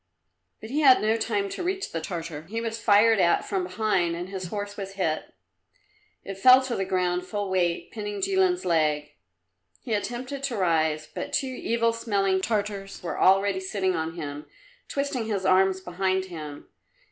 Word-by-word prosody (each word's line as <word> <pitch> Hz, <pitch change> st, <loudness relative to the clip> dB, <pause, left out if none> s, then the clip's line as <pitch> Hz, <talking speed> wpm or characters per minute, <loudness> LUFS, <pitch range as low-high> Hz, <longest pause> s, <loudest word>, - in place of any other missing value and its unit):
But 220 Hz, -, -8 dB
he 290 Hz, -, 0 dB
had 270 Hz, -4 st, +7 dB
no 220 Hz, +1 st, +2 dB
time 210 Hz, -3 st, -1 dB
to -, -, -5 dB
reach 380 Hz, +2 st, -2 dB
the 165 Hz, -, -3 dB
Tartar; 160 Hz, -2 st, -6 dB
he 225 Hz, +2 st, -3 dB
was 230 Hz, 0 st, -4 dB
fired 220 Hz, 0 st, +5 dB
at 170 Hz, -2 st, +3 dB
from 190 Hz, -3 st, -1 dB
behind 185 Hz, -3 st, 0 dB
and 175 Hz, +2 st, -5 dB
his 190 Hz, -2 st, -5 dB
horse 205 Hz, +2 st, -5 dB
was 195 Hz, -1 st, -6 dB
hit. 170 Hz, -5 st, -2 dB, 0.9 s
It 195 Hz, 0 st, -7 dB
fell 255 Hz, +4 st, +7 dB
to 255 Hz, -2 st, -2 dB
the 195 Hz, -, -1 dB
ground 180 Hz, -1 st, 0 dB
full 205 Hz, -1 st, -3 dB
weight, 175 Hz, -2 st, 0 dB
pinning 210 Hz, -2 st, -5 dB
Jilin's 380 Hz, -, +1 dB
leg. 150 Hz, -3 st, +1 dB, 0.7 s
He 230 Hz, -, -3 dB
attempted 245 Hz, +6 st, -3 dB
to 250 Hz, -5 st, -3 dB
rise, 160 Hz, -4 st, +1 dB
but 285 Hz, 0 st, -7 dB
two 275 Hz, -, +1 dB
evil 230 Hz, -2 st, 0 dB
smelling 195 Hz, -4 st, 0 dB
Tartars 205 Hz, -2 st, -3 dB
were 170 Hz, -, -4 dB
already 195 Hz, +1 st, +4 dB
sitting 190 Hz, -1 st, -1 dB
on 160 Hz, 0 st, -3 dB
him, 145 Hz, -3 st, -6 dB, 0.4 s
twisting 275 Hz, -5 st, -2 dB
his 200 Hz, -4 st, -2 dB
arms 190 Hz, 0 st, +3 dB
behind 185 Hz, +1 st, -1 dB
him. 155 Hz, -5 st, -8 dB
195 Hz, 170 wpm, -26 LUFS, 180-225 Hz, 0.9 s, had